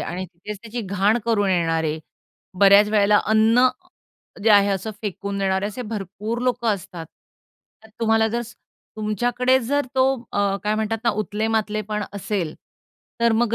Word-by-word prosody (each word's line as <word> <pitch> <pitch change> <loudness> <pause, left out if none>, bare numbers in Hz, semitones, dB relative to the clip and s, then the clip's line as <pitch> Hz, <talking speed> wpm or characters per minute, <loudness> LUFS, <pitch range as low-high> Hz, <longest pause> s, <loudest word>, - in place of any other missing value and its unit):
आणि 180 +2 -4
तिथेच 190 +4 -9
त्याची 235 +1 -5
घाण 200 +2 +1
करून 205 -4 +1
येणारे. 165 -3 0 0.6
बऱ्याच 200 +1 +7
वेळेला 210 -1 +4
अन्न 225 +4 +4 0.7
जे 225 - +4
आहे 205 -1 +6
असं 195 +2 -2
फेकून 200 -1 -4
देणारे, 190 0 0
असे 215 +4 -6
भरपूर 215 +1 -5
लोकं 245 -2 0
असतात. 170 -3 -9 0.8
तर - - -15
तुम्हाला 225 -1 +3
जर 235 +2 -2
स 230 -1 -12 0.4
तुमच्याकडे 245 +5 +1
जर 285 +3 -1
तो 260 0 +4 0.3
अ, 200 -1 +1
काय 210 +1 +1
म्हणतात 220 +1 -1
ना, 235 - +4
उतले-मातलेपण 215 0 -2
असेल, 195 -5 -3 0.7
तर 235 0 +4
मग 230 0 +1
210 Hz, 145 wpm, -22 LUFS, 200-225 Hz, 0.8 s, बऱ्याच